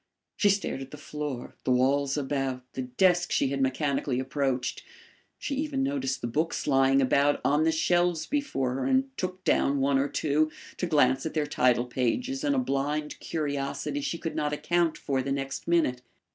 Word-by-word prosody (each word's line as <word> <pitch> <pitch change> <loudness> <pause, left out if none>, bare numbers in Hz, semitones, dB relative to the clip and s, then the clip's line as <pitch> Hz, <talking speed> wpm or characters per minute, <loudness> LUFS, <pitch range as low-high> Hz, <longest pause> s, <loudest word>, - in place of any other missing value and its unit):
She 205 - +3
stared 195 -8 0
at 135 - -7
the 150 - -9
floor, 145 -5 -5
the - - -2
walls 135 +3 +2
about, 135 -2 -2
the 130 - -3
desk 175 +8 +2
she 135 - +2
had 135 0 -2
mechanically 135 -1 0
approached. 130 -1 -1 0.6
She 285 - -4
even 285 -2 -1
noticed 270 -1 -1
the 120 - -2
books 155 +7 -1
lying 135 -1 +4
about 140 +2 +3
on 150 +2 +3
the 160 - +4
shelves 175 0 +1
before 220 - -1
her 135 - -2
and 265 0 +1
took 185 -2 -4
down 140 -5 +2
one 135 0 +2
or 140 +1 0
two, 155 +1 +1 0.3
to 180 - -1
glance 140 -2 +3
at 160 - -7
their 155 -1 +1
title 125 -4 +2
pages 190 - -1
in 285 -1 +2
a - - +1
blind 150 - -1
curiosity 145 -1 -3
she 170 - -2
could 165 0 -5
not 150 0 -1
account 165 +2 +1
for 135 -2 -1
the 135 +1 -3
next 135 0 -3
minute. 160 -8 +2
145 Hz, 185 wpm, -28 LUFS, 135-170 Hz, 0.6 s, lying